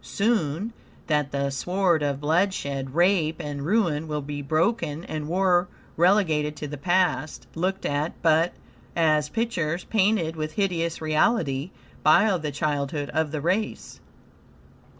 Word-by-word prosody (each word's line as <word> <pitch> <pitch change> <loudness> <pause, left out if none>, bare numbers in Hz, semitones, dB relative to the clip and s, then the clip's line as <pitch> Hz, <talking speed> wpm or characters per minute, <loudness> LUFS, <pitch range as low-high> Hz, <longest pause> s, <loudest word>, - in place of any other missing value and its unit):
Soon, 200 -2 0 0.3
that 150 -3 0
the 140 0 -1
sword 180 +3 +1
of 140 -2 -1
bloodshed, 145 -5 0
rape, 175 -3 +2
and 145 -3 -5
ruin, 165 -4 +1
will 150 -1 -3
be 145 0 -5
broken 160 +2 0
and 155 -3 -5
war 180 +1 +2 0.3
relegated 160 -5 +2
to 150 - -6
the 145 +1 -6
past, 175 -3 0
looked 185 +3 -2
at, 145 +3 -2
but, 165 +1 +4 0.4
as 155 -3 +2
pictures, 175 -5 -1
painted 200 -6 +1
with 155 -1 -4
hideous 170 -5 -1
reality 155 - +1 0.3
by 195 +6 +5
the 155 -1 -3
childhood 145 -1 -2
of 160 +1 0
the 150 0 -4
race. 195 +7 -2
160 Hz, 130 wpm, -25 LUFS, 150-185 Hz, 0.4 s, by